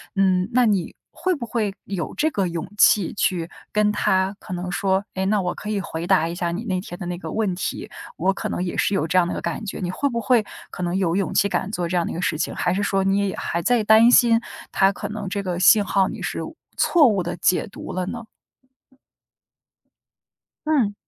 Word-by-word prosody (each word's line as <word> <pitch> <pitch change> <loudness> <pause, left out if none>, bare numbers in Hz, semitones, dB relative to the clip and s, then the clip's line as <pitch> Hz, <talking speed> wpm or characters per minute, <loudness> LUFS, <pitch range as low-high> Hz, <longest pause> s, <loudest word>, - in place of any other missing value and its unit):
嗯， 190 0 +2
那 250 0 +4
你 200 -6 0 0.2
会 370 - -1
不 260 -6 -5
会 215 -4 -1
有 185 -5 -4
这 315 - +2
个 200 -10 -1
勇 170 +1 -5
气 200 -2 +5
去 185 -4 -1 0.2
跟 210 0 +2
他 190 -1 +1
可 - - -8
能 180 0 -4
说， 195 0 +1
哎， 190 0 -1
那 205 +1 +2
我 180 -1 -2
可 210 - -7
以 200 -2 -1
回 165 -2 -5
答 180 -4 +3
一 170 - -5
下 175 -1 -2
你 185 +7 -4
那 185 -4 -1
天 175 -1 -8
的 180 - -5
那 175 0 -3
个 - - -7
问 210 -5 -1
题， - - -4 0.3
我 195 - +2
可 - - -4
能 180 - -2
也 180 - -4
是 205 - +1
有 160 -5 0
这 185 +3 +1
样 175 - +4
的 - - -3
一 - - -4
个 - - -4
感 170 +6 -4
觉。 200 - -5
你 180 - -3
会 235 +10 -1
不 235 -2 -2
会 225 0 +3 0.2
可 180 - -6
能 175 0 -1
有 180 -3 +1
勇 195 -1 -1
气 200 - +3
敢 200 - -2
做 175 -5 -2
这 180 - -1
样 170 - +1
的 - - -4
一 - - -5
个 170 - -3
事 155 - 0
情， 160 - -2
还 180 - 0
是 200 - -1
说 195 -1 +1
你 195 +1 +2
也 200 -1 +1
也 - - -5
还 170 - -2
在 240 +2 +2
担 220 +3 +6
心 235 -2 +6 0.3
他 195 0 +4
可 205 0 -6
能 215 -2 -5
这 200 +2 -2
个 180 -3 -3
信 205 +3 +6
号 195 -1 +2
你 - - -7
是 - - -3
误 - - -9 0.2
错 320 -6 +5
误 200 -6 +1
地 175 - -4
解 180 - +1
读 - - -9
了 185 0 -2
呢？ 230 +3 -6 2.4
嗯。 250 -10 +2
195 Hz, 265 characters per minute, -22 LUFS, 180-210 Hz, 2.4 s, 担